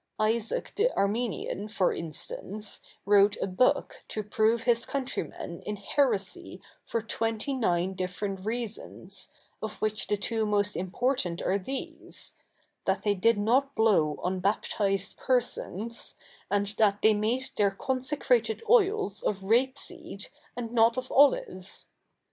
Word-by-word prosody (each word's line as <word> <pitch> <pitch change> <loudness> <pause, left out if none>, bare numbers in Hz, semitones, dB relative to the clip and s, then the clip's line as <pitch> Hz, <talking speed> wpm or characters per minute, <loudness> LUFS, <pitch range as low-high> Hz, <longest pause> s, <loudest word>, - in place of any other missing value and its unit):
Isaac 220 +1 0
the 450 +4 +3
Armenian, 210 -1 -1
for 200 -3 +1
instance, 210 - -6 0.2
wrote 200 0 +5
a - - 0
book 255 +9 +1
to 215 - -3
prove 220 +2 +2
his 235 -1 +3
countrymen 255 -10 -4
in 210 - -4
heresy 205 -2 -1 0.3
for 230 - -1
twenty 225 +4 -1
nine 190 -7 +1
different 185 +1 -3
reasons, 230 0 -5 0.3
of 220 -1 -5
which 215 0 -1
the 210 - +1
two 225 +2 -1
most 205 -1 +1
important 185 -1 -1
are 195 +2 +1
these 265 +8 -6 0.3
— - - -42
that - - +1
they 205 - +3
did 210 +4 +3
7iot 260 +7 +2
blow 185 -10 +3
on 185 +1 0
baptised 195 0 0
persons, 235 -3 -1 0.3
and 205 0 0
that 205 -2 +3
they 220 - +7
made 230 +5 -1
their 205 -1 +4
consecrated 290 - 0
oils 405 - +3
of 195 -2 -1
rapeseed 245 +6 -1 0.3
and 230 -2 -4
not 230 0 +4
of 255 0 -3
olives. 195 -9 +3
215 Hz, 130 wpm, -29 LUFS, 200-245 Hz, 0.3 s, they